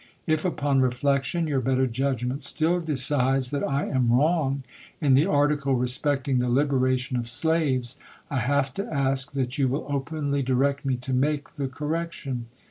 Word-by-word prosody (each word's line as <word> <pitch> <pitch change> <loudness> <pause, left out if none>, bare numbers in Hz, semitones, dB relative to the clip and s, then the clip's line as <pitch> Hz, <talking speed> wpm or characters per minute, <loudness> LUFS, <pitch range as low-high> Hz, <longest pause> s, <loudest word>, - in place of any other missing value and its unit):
If, 155 -1 0
upon 145 -6 +1
reflection, 140 +5 0
your 140 -4 0
better 130 +1 +1
judgment 130 +1 -2
still 165 +3 +2
decides 135 -4 +2
that 140 -1 -2
I 140 0 0
am 125 -4 +1
wrong 140 0 +2 0.4
in 145 -5 +3
the 145 +7 +4
article 145 -4 +2
respecting 130 +2 +1
the 125 0 0
liberation 130 -1 +1
of 120 -1 -3
slaves, 135 -2 0 0.3
I 140 - -2
have 135 +2 0
to 205 +7 -5
ask 135 0 -1
that 130 +1 -2
you 135 - +3
will 135 +3 -2
openly 145 0 -2
direct 135 +2 0
me 135 -1 +1
to 125 +1 -5
make 145 +3 0
the 140 -2 -4
correction. 150 -3 -4
135 Hz, 160 wpm, -25 LUFS, 130-145 Hz, 0.4 s, the